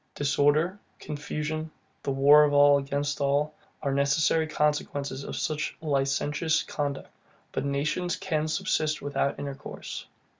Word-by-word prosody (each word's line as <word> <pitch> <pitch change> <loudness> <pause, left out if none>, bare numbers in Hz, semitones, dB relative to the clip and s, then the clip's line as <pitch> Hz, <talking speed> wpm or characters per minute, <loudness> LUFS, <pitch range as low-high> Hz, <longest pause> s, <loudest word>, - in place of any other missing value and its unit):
Disorder, 145 +6 +2 0.2
confusion, 150 +1 -4 0.3
the - - -4
war 140 +2 +7
of 145 -1 +2
all 145 0 +6
against 145 +1 -2
all, 145 +2 +1 0.3
are 140 - 0
the 135 - 0
necessary 155 +3 +2
consequences 145 -2 -1
of - - -6
such 155 0 -2
a - - -12
licentious 145 +2 +1
conduct. 145 -2 -4 0.4
But - - -2
nations 150 +6 -1
can 155 -4 -1
subsist 155 0 0
without 140 -1 -1
intercourse. 140 -1 -7
145 Hz, 135 wpm, -27 LUFS, 140-155 Hz, 0.4 s, war